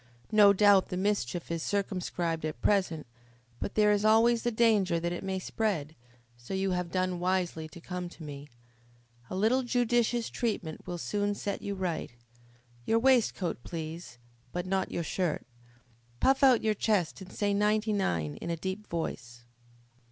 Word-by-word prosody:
No 210 -2 +7
doubt 200 -1 +5
the 180 - -3
mischief 185 -6 -1
is 165 -1 -2
circumscribed 180 -4 -2
at 155 -5 -3
present, 175 -1 +1 0.5
but - - -4
there 210 -1 +5
is 205 0 +2
always 225 +2 +5
the 240 - 0
danger 215 -7 +3
that 170 +1 -2
it 175 - -4
may 190 0 -2
spread, 185 -6 -2 0.4
so 120 +10 -6
you 190 0 0
have 180 -1 -1
done 185 0 -1
wisely 180 -3 -1
to 165 - -12
come 180 +1 -5
to 170 - -12
me. 145 -1 -8 0.8
A - - -4
little 225 +7 +3
judicious 240 -1 +1
treatment 200 -9 -3
will 175 - -3
soon 205 +3 -1
set 200 0 -4
you 200 0 -3
right. 180 -4 -2 0.7
Your 225 - +2
waistcoat, 230 - +2
please, 160 -4 -6 0.3
but 180 0 -3
not 190 0 0
your 170 - -2
shirt. 170 -1 -2 0.7
Puff 270 +1 +3
out 260 -4 +6
your 215 -1 +2
chest 200 -4 0
and 190 - -10
say 205 -1 0
ninety 210 +1 +2
nine 85 - -1
in - - -6
a 170 - -1
deep 190 +5 -5
voice." 120 -8 -5
190 Hz, 165 wpm, -30 LUFS, 170-210 Hz, 0.8 s, No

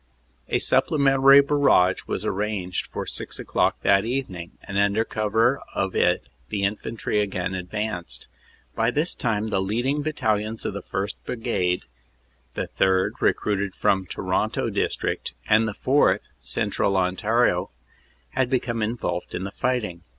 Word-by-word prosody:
"A - - +2
supplementary 135 -1 +5
barrage 140 -11 +3
was - - -3
arranged 95 -3 -2
for - - -5
six - - -4
o - - -5
clock - - +1
that 100 0 +4
evening, 110 -9 -4
and 100 0 -2
under 100 +2 +2
cover 110 +5 +1
of 95 -1 -1
it - - +2 0.3
the 100 -2 -2
infantry 105 +1 -1
again 95 -3 -1
advanced. 90 - -4 0.5
By 115 +1 +1
this 150 +7 +1
time 110 -2 -1
the 95 -3 +1
leading 120 +9 0
battalions 110 -7 -1
of - - -2
the 100 - -5
1st. 95 +2 -3
Brigade 90 -7 -1 0.7
the - - -2
3rd., 95 0 +1
recruited 100 -2 0
from 95 -1 +1
Toronto - - -1
district, - - -2
and 110 +1 +4
the 105 - -4
4th., 140 +3 +3 0.2
Central 100 -1 0
Ontario 95 +1 +1 0.6
had 130 -2 0
become 120 -3 -1
involved 105 -5 -2
in 90 - -3
the 100 - -4
fighting. 105 -10 -2
105 Hz, 140 wpm, -24 LUFS, 95-120 Hz, 0.7 s, supplementary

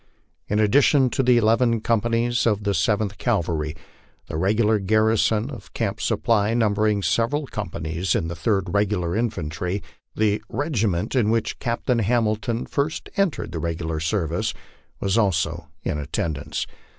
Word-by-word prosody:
In 105 - 0
addition 130 +4 +4
to - - +1
the 125 -1 +4
eleven 115 +1 +3
companies 115 +2 +1
of 105 -2 +1
the 100 0 +1
Seventh 105 0 0
Cavalry, 80 -9 -1 0.5
the - - -6
regular 105 +5 +2
garrison 110 +3 +2
of 125 - -10
Camp 110 -2 -2
Supply, 110 -1 +1
numbering 105 -2 +2
several 130 +9 +1
companies 85 - -3
of 80 - 0
the 85 - -4
Third 95 +3 0
Regular 100 -4 +1
Infantry, 95 -4 -2 0.3
the 105 -1 +1
regi 140 -7 0
rnent 90 +6 -1
in 115 -5 +3
which 115 -1 0
Captain 120 0 0
Hamilton 115 +1 0
had - - -7
first 145 +3 -2
entered 195 - 0
the 85 - -4
regular 80 -1 -2
service, 85 0 -1 0.4
was 100 +3 +1
also 85 -5 0 0.2
in 75 - -2
attendance. 75 +1 -3
105 Hz, 145 wpm, -23 LUFS, 90-115 Hz, 0.5 s, addition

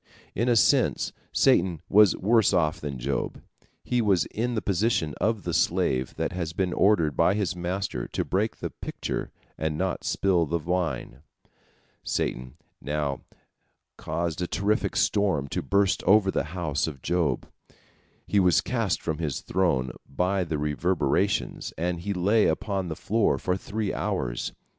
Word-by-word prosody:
In 120 +4 0
a 120 - +4
sense 110 - +3 0.2
Satan 85 -3 +3
was 105 -1 +6
worse 110 +1 +3
off 80 -3 +1
than 70 -3 -4
Job. 70 +2 -3 0.4
He 125 -1 +1
was 100 -5 +3
in 120 +2 -1
the 110 - 0
position 95 -5 +1
of 110 -2 +1
the 85 - -3
slave 85 -6 +1
that - - -2
has 85 -3 -4
been 90 0 -1
ordered 85 -8 +3
by 85 +4 +3
his 100 -4 -1
master 90 -7 -3
to - - -2
break 105 +4 0
the - - -5
pitcher - - -5 0.3
and 80 -1 -1
not 95 +1 -2
spill 90 -4 +1
the 85 +3 0
wine. 85 -6 -2 0.8
Satan 65 0 -2 0.3
now 75 -2 -2 0.7
caused 85 0 -3
a 90 - -1
terrific 105 +3 0
storm 95 -10 +1
to - - -2
burst 100 -1 +2
over 95 0 +5
the - - -1
house 80 -5 0
of 70 -5 -7
Job. 85 -7 0 0.8
He 105 - +2
was 90 -4 +4
cast 115 -8 -1
from 80 -2 -2
his 75 -5 -2
throne 70 -9 0 0.2
by 90 +7 0
the 80 -2 -2
reverberations, 75 +1 0
and 85 +1 -1
he 100 +4 -3
lay 100 +4 +3
upon 95 -3 -1
the 80 - -4
floor 110 +6 +1
for 90 - -1
three 100 +2 -3
hours. 70 -13 -2
90 Hz, 155 wpm, -26 LUFS, 80-100 Hz, 0.8 s, was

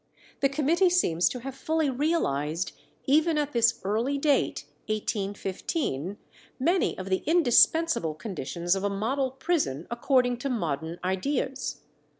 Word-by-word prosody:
The 275 - +3
committee 310 +6 +2
seems 175 - +2
to 250 - -6
have 270 +2 -6
fully 315 +3 0
realized, 185 - 0 0.3
even 310 +3 +3
at 295 -1 -1
this 235 0 +3
early 225 +8 0
date 275 - +1 0.2
(1815), 200 - -2 0.4
many 345 +8 +1
of 190 0 -6
the 190 - +1
indispensable 320 - +4
conditions 175 - -2
of 195 - -3
a 200 - +1
model 250 +7 -1
prison 265 - -1
according 245 0 +2
to 275 +3 -3
modern 165 - -2
ideas. 260 +8 -2
245 Hz, 130 wpm, -27 LUFS, 185-290 Hz, 0.4 s, indispensable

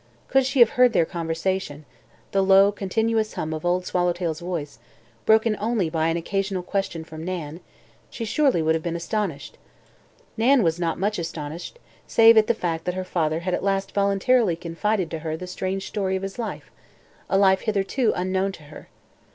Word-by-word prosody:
Could 270 0 +3
she 275 0 -1
have 235 - +8
heard 250 -1 +4
their 165 - +3
conversation 165 -2 -3 0.5
the 195 - +2
low, 195 +1 +6
continuous 220 +2 -1
hum 160 0 -3
of 155 - -5
Old 180 +1 0
Swallowtail's 175 -3 -1
voice, 165 -7 -5 0.5
broken 220 0 +4
only 210 -6 0
by 160 -1 +1
an 165 +1 0
occasional 195 +1 -2
question 185 -4 -3
from 160 0 -9
Nan 165 -3 -5 0.5
she 230 - -6
would - - -4
surely 190 - +2
have 160 - -1
been 170 0 -3
astonished. 170 - -4 0.8
Nan 245 +2 +4
was 165 0 0
not 165 -2 -1
much 205 +1 -1
astonished, 165 - -6 0.3
save 225 0 +6
at 220 -1 +5
the 235 - +2
fact 165 -4 -3
that 180 - -2
her 185 - -3
father 165 -3 -1
had 180 +1 -2
at - - -1
last 195 0 0
voluntarily 200 +1 +2
confided 175 +2 -2
to 165 - -4
her 160 0 -4
the 180 - -7
strange 185 +1 -4
story 195 -3 -1
of 190 - -3
his 195 +4 -6
life, 230 - -5 0.6
a 195 - +2
life 190 -1 +4
hitherto 215 +3 0
unknown 190 +2 0
to 155 - -12
her. 150 +1 -13
185 Hz, 185 wpm, -24 LUFS, 165-210 Hz, 0.8 s, have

